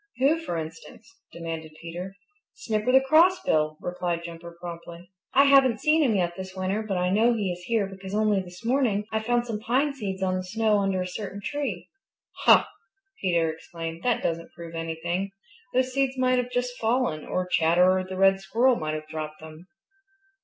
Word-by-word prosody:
"Who, 280 +6 +3
for 310 - -4
instance?" 165 +7 -8 0.2
demanded 165 -2 -6
Peter. 175 +3 -7 0.4
"Snipper 220 - -1
the 265 +1 +6
Crossbill," 270 - +3
replied 175 -1 -3
Jumper 170 0 -9
promptly. 170 +1 -9 0.2
"I 275 - +8
haven't 270 -4 +5
seen 310 +5 +3
him 245 -8 +3
yet 175 -2 0
this 190 0 -8
winter, 190 +3 -1
but 205 -4 -2
I 180 0 +1
know 225 +5 +4
he 205 -5 -1
is 180 0 -6
here 225 -3 +1
because 195 0 -7
only 210 -2 +2
this 180 +4 -12
morning 235 -5 +1
I 220 - +1
found 240 +2 0
some 225 -3 -4
pine 260 +6 +1
seeds 195 -7 -4
on 185 -1 +1
the 185 - -3
snow 215 +2 +1
under 195 -2 0
a - - -5
certain 200 +1 -6
tree." 290 +7 -4 0.6
"Huh!" - - +8 0.6
Peter 170 -4 +2
exclaimed. 165 0 -7
"That 245 +1 0
doesn't 165 0 -2
prove 170 -1 -9
anything. 170 +4 -3 0.4
Those 255 0 +2
seeds 270 -1 0
might 255 0 +3
have 250 0 -2
just 245 0 -2
fallen, 225 -9 0
or 185 - -2
Chatterer 180 +2 +3
the 185 0 -7
Red 195 0 +5
Squirrel 240 +5 +2
might 155 0 -2
have 155 0 -6
dropped 155 -1 -6
them." 160 +2 -12
190 Hz, 180 wpm, -26 LUFS, 170-240 Hz, 0.6 s, I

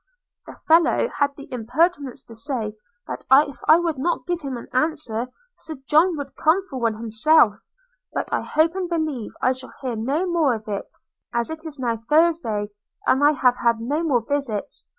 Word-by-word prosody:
'The - - -10
fellow 330 +7 +4
had 285 -1 +4
the 280 - -10
impertinence 270 +4 0
to 230 - -13
say, 225 -3 -4 0.3
that - - -6 0.2
if 280 - -11
I 315 - +8
would 335 -5 -1
not 345 +6 -1
give 350 -1 -2
him 270 -4 -4
an 235 - -9
answer, 255 -5 -1 0.3
Sir 315 - -7
John 325 +3 +4
would 280 -2 -7
come 330 +5 +2
for 275 -9 -7
one 230 -2 0
himself; 225 +1 +3 0.5
but - - -3
I - - +1
hope 315 +2 +1
and 370 -2 -3
believe 310 -9 -2
I 255 - +4
shall 260 0 -7
hear 250 -3 -2
no 275 +11 -1
more 330 -8 +2
of 220 -1 -9
it, 200 -2 -4 0.5
as 235 +5 0
it 320 +1 -7
is 300 -2 -8
now 240 -3 -1
Thursday, 235 -6 +1 0.3
and 265 +2 +3
I 295 +1 +6
have 250 -3 +2
had 235 -1 +2
no 285 +8 -1
more 280 -8 +2
visits. 275 -8 -3
280 Hz, 190 wpm, -23 LUFS, 235-320 Hz, 0.5 s, I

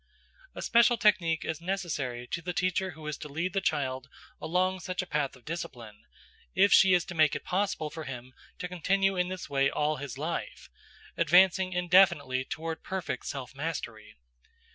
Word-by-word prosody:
A - - -5
special 235 0 +4
technique 185 -7 +2
is 160 0 -3
necessary 160 -10 -3
to 170 - -4
the 180 +2 -4
teacher 185 +1 0
who 155 - -10
is 150 -2 -4
to 150 - -7
lead 170 +6 -2
the 195 - 0
child 130 -4 -1 0.3
along 185 +3 0
such 185 +2 -3
a - - -8
path 145 -5 -1
of 130 - -20
discipline, 120 -10 -7 0.5
if 200 +2 +5
she 190 -1 +7
is 175 - +1
to 175 - -7
make 155 -3 +3
it - - -5
possible 180 -5 -1
for 160 -1 -7
him 130 -1 -8 0.2
to 180 - -4
continue 195 +2 +1
in 180 0 +1
this 185 0 -6
way 140 -1 +2
all 150 +1 0
his 135 -3 -7
life, - - -5 0.5
advancing 185 +3 +4
indefinitely 175 -8 +3
toward 160 +4 -5
perfect 185 -9 -4
self 135 -3 -5
mastery. 135 -7 -5
165 Hz, 175 wpm, -29 LUFS, 140-185 Hz, 0.5 s, she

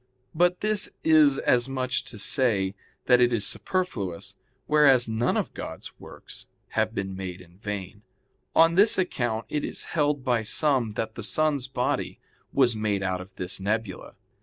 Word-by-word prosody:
But 175 +2 +2
this 215 -1 +1
is 155 -4 +5
as 125 0 +2
much 130 -1 -2
as - - +1
to 110 - -9
say 105 -4 +1 0.3
that 125 -1 +5
it 120 0 +4
is 110 -4 0
superfluous, 100 - -3 0.3
whereas 140 -5 +4
none 110 +2 0
of - - -2
God's - - -8
works - - -11 0.2
have 110 +1 -1
been 95 -2 -3
made 95 -1 -6
in 90 0 -17
vain. 105 -2 -6 0.5
On 165 +1 +6
this 210 +5 +5
account 120 - -1
it 150 +5 -2
is - - -4
held 145 -4 0
by 120 -3 +2
some 125 -1 +1
that 110 +1 -3
the - - -7
sun's 150 -4 +1
body 125 -2 -2 0.3
was 125 -4 +3
made 105 -2 -1
out 95 -1 -2
of 95 +1 -13
this 90 +1 -5
nebula. 105 0 -3
120 Hz, 165 wpm, -26 LUFS, 100-145 Hz, 0.5 s, On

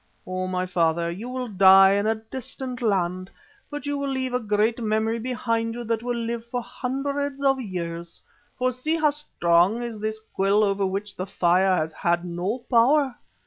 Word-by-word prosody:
O, 185 0 -3
my 185 0 -1
father, 170 -1 +1
you 210 +8 -6
will 255 0 -4
die 195 -1 +7
in 200 +1 +1
a 220 - +2
distant 250 +3 -7
land, 185 -4 0 0.4
but 290 -2 -6
you 285 0 -2
will 280 0 -2
leave 260 -1 -2
a 250 - +2
great 215 +2 +1
memory 220 +1 0
behind 230 -2 -2
you 240 - -5
that 225 -1 -1
will 245 0 -2
live 230 0 -3
for 240 +1 -4
hundreds 280 +3 -3
of 270 -1 +3
years, 170 -5 -5 0.4
for 255 0 +1
see 255 +6 -1
how 305 -2 +3
strong 195 - +1
is 230 -3 -5
this 215 +1 -3
quill 205 -1 +1
over 195 -1 +1
which 195 +2 -4
the 185 - -4
fire 185 0 +3
has 155 0 -2
had 170 +2 0
no 180 +8 -3
power. 265 +3 +4
220 Hz, 185 wpm, -24 LUFS, 185-250 Hz, 0.4 s, die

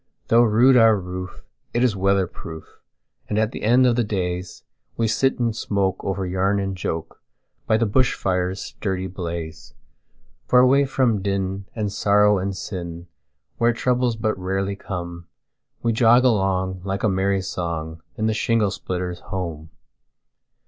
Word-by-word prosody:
Though 115 +1 +6
rude 120 +3 +5
our 115 -2 +6
roof, 90 0 -7 0.3
it 120 - +2
is 120 -5 +2
weather 95 0 +2
proof, 80 -2 -11 0.5
And 105 - -1
at 110 +1 +1
the - - -7
end 120 +4 +4
of 120 -2 +3
the 120 - +2
daysWe 90 +2 -4
sit 135 +5 +1
and 115 -3 0
smoke 100 -3 -1
over 95 -1 -2
yarn 95 +2 +1
and 95 -1 -2
joke, 80 -3 -5 0.5
By 110 - +3
the 115 - +1
bush 125 +4 +2
fire's 90 0 -1
sturdy 95 -2 -4
blaze. 85 -7 -6 0.7
For 125 - +4
away 130 +3 +5
from 125 -6 +1
din, 95 0 -2
and 105 -3 -2
sorrow 105 0 +3
and 95 0 -3
sin, 85 -3 -6 0.5
Where 120 0 +3
troubles 125 0 +1
but 110 0 -1
rarely 95 +2 -2
come, 85 -3 -6 0.6
We 115 - +2
jog 120 +2 +5
along, 95 -5 +1
like 100 0 -3
a - - +4
merry 95 0 +1
song, 80 -3 -4 0.2
In 110 - -1
the 110 - +2
shingle 110 -2 +1
splitter's 90 -1 -4
home. 85 -5 -5
100 Hz, 155 wpm, -22 LUFS, 90-110 Hz, 0.7 s, Though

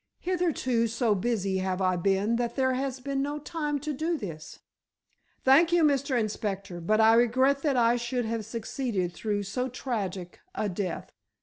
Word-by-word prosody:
Hitherto 325 -10 0
so 230 0 +1
busy 195 -2 -1
have 185 0 -1
I 185 -1 +2
been 195 +5 +1
that 235 -1 -2
there 260 -1 +2
has 265 0 -2
been 275 +1 -2
no 290 +2 -2
time 300 -1 -3
to 300 +1 -3
do 320 +4 -1
this." 165 - -8 0.9
"Thank 305 +6 +5
you, 345 -1 +4
Mr. 280 -3 +2
Inspector, 200 -4 -3
but 215 +6 +2
I 220 0 +6
regret 260 +4 +3
that 280 -4 +1
I 235 0 +4
should 240 0 -2
have 225 0 -2
succeeded 220 -4 -3
through 205 +2 -2
so 250 +6 -2
tragic 200 -8 -4 0.2
a 210 - -1
death." 185 -2 -4
235 Hz, 170 wpm, -28 LUFS, 200-270 Hz, 0.9 s, I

